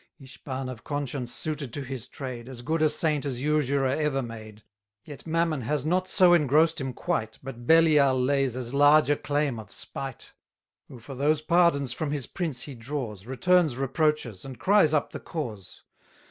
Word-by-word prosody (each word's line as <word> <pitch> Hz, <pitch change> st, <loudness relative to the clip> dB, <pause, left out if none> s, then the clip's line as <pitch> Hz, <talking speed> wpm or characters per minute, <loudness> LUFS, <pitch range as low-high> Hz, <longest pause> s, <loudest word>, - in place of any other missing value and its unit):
Ishban 135 Hz, -1 st, -7 dB
of 130 Hz, -3 st, -8 dB
conscience 140 Hz, -4 st, -4 dB
suited 150 Hz, -5 st, -4 dB
to 145 Hz, -, -4 dB
his 130 Hz, -2 st, -6 dB
trade, 125 Hz, -3 st, -7 dB
As 125 Hz, -2 st, -9 dB
good 160 Hz, +4 st, -1 dB
a 155 Hz, -, +4 dB
saint 150 Hz, -1 st, 0 dB
as 130 Hz, -3 st, -3 dB
usurer 145 Hz, -2 st, +1 dB
ever 135 Hz, 0 st, 0 dB
made. 110 Hz, -2 st, -10 dB, 0.4 s
Yet 145 Hz, +1 st, -10 dB
Mammon 165 Hz, -3 st, 0 dB
has 145 Hz, +4 st, -1 dB
not 185 Hz, +3 st, +1 dB
so 180 Hz, -3 st, +5 dB
engross'd 155 Hz, 0 st, +3 dB
him 135 Hz, -1 st, -3 dB
quite, 110 Hz, -2 st, -3 dB
But 120 Hz, -2 st, -8 dB
Belial 150 Hz, -5 st, +5 dB
lays 135 Hz, -1 st, +1 dB
as 125 Hz, -1 st, -4 dB
large 145 Hz, +1 st, +5 dB
a -, -, +4 dB
claim 145 Hz, -3 st, -1 dB
of 110 Hz, -, -11 dB
spite; 135 Hz, -2 st, -6 dB, 0.5 s
Who, 130 Hz, -, -11 dB
for 120 Hz, +4 st, -10 dB
those 145 Hz, +3 st, +1 dB
pardons 160 Hz, -6 st, +2 dB
from 155 Hz, +3 st, -3 dB
his 145 Hz, -3 st, -3 dB
prince 160 Hz, -9 st, -4 dB
he 145 Hz, -, -8 dB
draws, 115 Hz, -5 st, -6 dB
Returns 160 Hz, +1 st, +2 dB
reproaches, 135 Hz, -, -1 dB
and 130 Hz, -2 st, -8 dB
cries 195 Hz, -, +4 dB
up 150 Hz, -, 0 dB
the -, -, -6 dB
cause. 110 Hz, -, -7 dB
140 Hz, 175 wpm, -26 LUFS, 125-155 Hz, 0.5 s, so